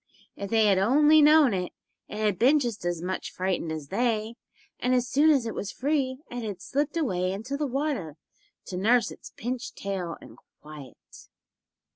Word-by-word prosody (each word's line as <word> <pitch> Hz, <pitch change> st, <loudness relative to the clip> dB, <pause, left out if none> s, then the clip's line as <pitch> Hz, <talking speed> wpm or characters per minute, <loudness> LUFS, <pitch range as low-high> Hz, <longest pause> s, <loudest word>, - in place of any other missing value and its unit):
If 200 Hz, -, -6 dB
they 220 Hz, 0 st, +3 dB
had 195 Hz, -2 st, +4 dB
only 295 Hz, +9 st, +5 dB
known 300 Hz, -5 st, +6 dB
it, 180 Hz, -2 st, -3 dB, 0.3 s
it 210 Hz, -, -8 dB
had 210 Hz, -4 st, 0 dB
been 270 Hz, +6 st, +5 dB
just 235 Hz, -8 st, -4 dB
as 175 Hz, -1 st, -2 dB
much 185 Hz, +1 st, -4 dB
frightened 180 Hz, -3 st, -2 dB
as 155 Hz, -3 st, -6 dB
they, 225 Hz, 0 st, 0 dB, 0.5 s
and 255 Hz, +1 st, +1 dB
as 250 Hz, 0 st, +1 dB
soon 290 Hz, +5 st, +3 dB
as 275 Hz, -6 st, +3 dB
it 225 Hz, -, -3 dB
was 205 Hz, -, -4 dB
free 270 Hz, -2 st, -1 dB
it 245 Hz, 0 st, -4 dB
had 205 Hz, -4 st, -5 dB
slipped 285 Hz, -, -2 dB
away 185 Hz, -, 0 dB
into 225 Hz, +8 st, -4 dB
the 295 Hz, 0 st, -1 dB
water 265 Hz, -, -3 dB, 0.5 s
to 180 Hz, -, -6 dB
nurse 230 Hz, +5 st, +3 dB
its -, -, -12 dB
pinched 250 Hz, +3 st, -4 dB
tail 185 Hz, -4 st, -4 dB
in -, -, -14 dB, 0.2 s
quiet. 150 Hz, -4 st, -13 dB
225 Hz, 180 wpm, -27 LUFS, 185-270 Hz, 0.5 s, known